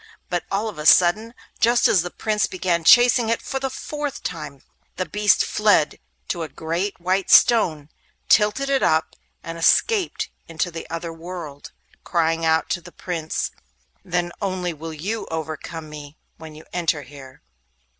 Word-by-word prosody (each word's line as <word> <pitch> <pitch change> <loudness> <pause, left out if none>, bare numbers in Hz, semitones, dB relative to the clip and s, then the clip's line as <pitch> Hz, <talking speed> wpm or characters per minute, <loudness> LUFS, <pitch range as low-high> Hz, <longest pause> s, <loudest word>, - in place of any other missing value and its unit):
But 175 -1 -2
all 205 +3 -1
of 210 -8 -7
a 150 - -5
sudden, 215 +9 +4 0.2
just 240 +2 +4
as 185 - +4
the 180 - -4
Prince 215 +3 -1
began 180 -2 -1
chasing 240 +3 +6
it 230 - +1
for 270 - -4
the 270 0 -2
fourth 290 +2 -5
time, - - -6 0.3
the - - -2
beast 210 0 +2
fled 205 -8 +2 0.3
to 170 - -2
a 160 - -4
great 170 +7 -3
white 185 +2 0
stone, 160 -11 +5 0.4
tilted 210 +6 +3
it 275 -1 +1
up, 160 0 +1 0.3
and 165 0 -7
escaped 395 - +2 0.2
into 165 +2 -2
the 165 0 -8
other 165 0 -5
world, 165 -4 -8 0.3
crying 165 -1 0
out 160 0 +2
to 175 - -1
the 175 +1 -13
Prince: 165 -4 -4 0.5
'Then 175 -2 -2
only 185 -3 -2
will 160 +1 -8
you 195 +9 -4
overcome 160 0 -5
me, 150 -1 -10 0.2
when 160 -1 -11
you 155 - -13
enter 165 -4 0
here. 135 - -14
175 Hz, 160 wpm, -22 LUFS, 160-210 Hz, 0.5 s, chasing